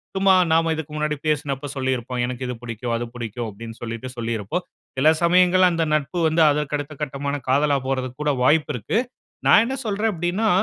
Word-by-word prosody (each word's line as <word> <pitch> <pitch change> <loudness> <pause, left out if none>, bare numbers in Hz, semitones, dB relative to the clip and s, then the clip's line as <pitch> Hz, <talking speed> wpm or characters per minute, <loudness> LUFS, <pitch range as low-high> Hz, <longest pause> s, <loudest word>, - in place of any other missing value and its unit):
சும்மா 190 0 +4 0.2
நாம்ம 165 0 +3
இதுக்கு 155 -1 -6
முன்னாடி 150 0 0
பேசினப்ப 145 -2 -1
சொல்லியிருப்போம். 130 -2 -1
எனக்கு 125 +1 -4
இது 125 - -3
பிடிக்கும், 115 0 -4
அது 120 - -3
பிடிக்கும். 120 0 -4
அப்டீன்னு 115 +2 -10
சொல்லிட்டு 115 +2 -5
சொல்லியிருப்போம். 115 - -2 0.3
சில 140 +4 +5
சமயங்கள் 180 +1 +5
அந்த 165 -1 0
நட்பு 155 +4 -2
வந்து 160 +1 +2
அதற்கு 150 0 -1
அடுத்த 145 +1 -6
கட்டமான 140 0 -3
காதலா 140 +2 +3
போறதுக்குக் 130 +1 -3
கூட 150 - +2
வாய்ப்பு 150 +4 +3
இருக்கு. 120 - -2 0.5
நான் - - +7
என்ன 260 +3 -2
சொல்றேன் 215 +1 0
அப்டீன்னா, 175 +6 -1
145 Hz, 175 wpm, -22 LUFS, 125-165 Hz, 0.5 s, நான்